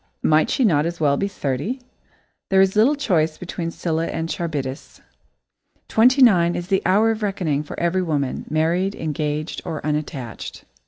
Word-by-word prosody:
Might 155 0 +3
she 260 - +2
not 155 -6 +3
as 170 0 -5
well 145 -3 +3
be 200 - -1
thirty? 170 - -3 0.7
There 190 - +4
is 190 +1 +4
little 235 +8 +4
choice 165 - 0
between 170 -1 -5
Scylla 165 -1 -2
and 165 0 -3
Charybdis. 145 -6 -4 0.9
Twenty 255 +4 +5
nine 175 -7 +5
is 175 +1 -5
the 195 -1 +2
hour 210 +4 +4
of 220 0 -4
reckoning 180 -8 -1
for 150 - -8
every 175 +2 +1
woman, 145 -6 -2
married, 170 +5 +1
engaged, 155 0 -3
or 165 -3 -4
unattached. 150 -5 -4
170 Hz, 160 wpm, -22 LUFS, 155-195 Hz, 0.9 s, Twenty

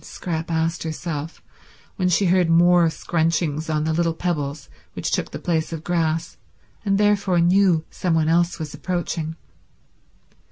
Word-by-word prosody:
Scrap 165 -2 -5
asked 165 0 0
herself 160 -1 -5 0.5
when 180 -1 +1
she 185 +3 +2
heard 180 -1 +3
more 170 0 +5
scrunchings 160 -1 -1
on 155 -1 0
the 160 0 0
little 165 0 0
pebbles 150 -5 -3 0.3
which - - -3
took - - -1
the - - -6
place 160 -2 -1
of 160 -1 -5
grass, 165 -1 -1 0.5
and 195 -2 +1
therefore 200 -3 +2
knew 175 -2 +3
some 175 -3 -1
one 160 -1 +2
else 170 +2 +2
was 155 -3 -6
approaching. 160 0 -3
165 Hz, 150 wpm, -22 LUFS, 160-175 Hz, 0.5 s, more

